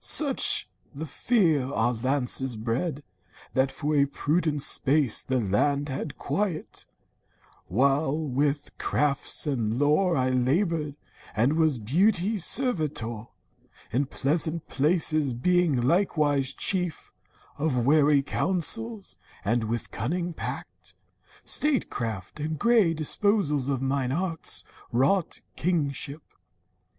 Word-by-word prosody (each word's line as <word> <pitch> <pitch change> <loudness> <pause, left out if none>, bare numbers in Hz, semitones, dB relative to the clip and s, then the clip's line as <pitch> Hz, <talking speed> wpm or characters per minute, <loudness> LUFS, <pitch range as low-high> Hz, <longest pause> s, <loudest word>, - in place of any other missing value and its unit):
Such 285 -3 +3 0.3
the 155 +3 -5
fear 160 - +1
Our 120 -1 +1
lances 130 +1 0
bred, 125 +8 -3 0.5
that 130 0 +1
for 150 +1 -2
a 140 -1 +3
prudent 150 0 0
space 140 -3 +3
The 130 -1 -1
land 140 +8 0
had 135 +2 -5
quiet, 165 +2 -3 0.8
while 135 - +1
with 145 -1 -1
crafts 145 -2 +1
and 120 -6 -1
lore 150 +5 +2
I 130 0 +1
labored, 150 +4 0 0.4
and 120 +7 +2
was 160 -4 +2
Beauty's 185 - +1
servitor 150 - 0 0.6
In 135 +4 0
pleasant 160 +4 -1
places, 155 -2 +2
being 170 +2 +2
likewise 145 -2 +1
chief 180 -4 0 0.5
Of 130 -6 0
wary 145 0 +4
councils, 200 - -2 0.3
and 115 +2 +1
with 115 +1 -3
cunning 175 +7 -3
pact, - - -7 0.5
Statecraft, 115 - 0
and 155 +1 -3
grey 225 -7 +3
disposal 155 -4 +1
of 135 -1 -2
mine 135 -1 -1
arts 165 +2 -1 0.3
Wrought 140 +9 +1
kingship. 150 -3 -2
145 Hz, 105 wpm, -26 LUFS, 130-170 Hz, 0.8 s, wary